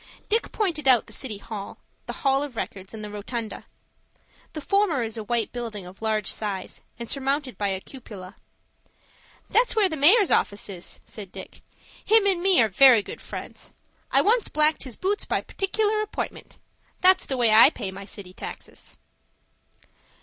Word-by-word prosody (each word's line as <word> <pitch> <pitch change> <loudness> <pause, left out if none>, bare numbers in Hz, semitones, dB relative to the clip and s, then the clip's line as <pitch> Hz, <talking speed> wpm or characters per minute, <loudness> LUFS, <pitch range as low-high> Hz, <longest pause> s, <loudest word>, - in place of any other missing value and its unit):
Dick 450 +2 +1
pointed 335 -9 -1
out 250 -4 +6
the - - -12
City 230 -6 -4
Hall, 205 -1 -8 0.3
the - - -3
Hall 270 0 +4
of 290 -4 -5
Records, 195 -3 -6
and 220 -1 -8
the 210 - -5
Rotunda. 215 +2 -6 0.9
The 310 - -5
former 380 - +1
is 225 -1 -4
a 220 - -4
white 235 +1 -1
building 225 -6 -6
of 180 +3 -13
large 215 -2 0
size, 200 -3 -5 0.2
and 235 - -6
surmounted 275 -1 -1
by 205 +1 -1
a 190 -1 -1
cupola. 200 -6 -11 1.2
"That's 480 -1 +3
where 425 -3 +4
the 320 - -4
mayor's 360 +8 +5
office 200 0 +1
is," 180 -3 -7
said 205 -5 -8
Dick. - - -10 0.4
"Him 440 -1 +5
and 380 -3 +2
me 380 0 +4
are - - +2
very 230 +2 +6
good - - -9
friends. - - -8 0.4
I - - +4
once 455 +2 +3
blacked 305 0 +2
his 250 -4 -8
boots 400 +2 -1
by - - 0
partic'lar 425 +2 -1
appointment. 430 - -6 0.4
That's 370 +1 +4
the 265 - -2
way 235 -3 +3
I 225 +5 +9
pay 195 -10 -6
my 195 +1 -9
city 195 -3 -8
taxes." - - -9
245 Hz, 170 wpm, -25 LUFS, -, 1.2 s, I